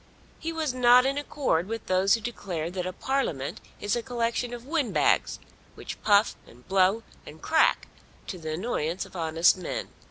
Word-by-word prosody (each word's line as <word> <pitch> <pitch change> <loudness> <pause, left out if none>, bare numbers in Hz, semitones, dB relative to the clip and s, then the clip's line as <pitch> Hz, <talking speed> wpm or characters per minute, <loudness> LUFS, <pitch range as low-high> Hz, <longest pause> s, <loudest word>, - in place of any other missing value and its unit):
He 330 - -3
was 315 -5 -2
not 250 0 +6
in 275 +1 0
accord 260 - -1
with 225 +1 -5
those 190 +2 +3
who 230 - -5
declare 180 -8 -4
that 180 -1 -3
a - - -2
Parliament 185 - -2 0.2
is 205 +2 0
a 240 - -1
collection 235 0 -2
of 240 0 -8
windbags 295 -3 +1 0.4
which - - -8
puff, 205 0 +4
and 125 +2 -18
blow, 195 +3 +3 0.2
and - - -12
crack - - +2 0.4
to 185 - -6
the 160 -1 -4
annoyance 175 -3 -2
of - - -16
honest 165 +1 +3
men. 180 - -4
210 Hz, 170 wpm, -27 LUFS, 180-245 Hz, 0.4 s, not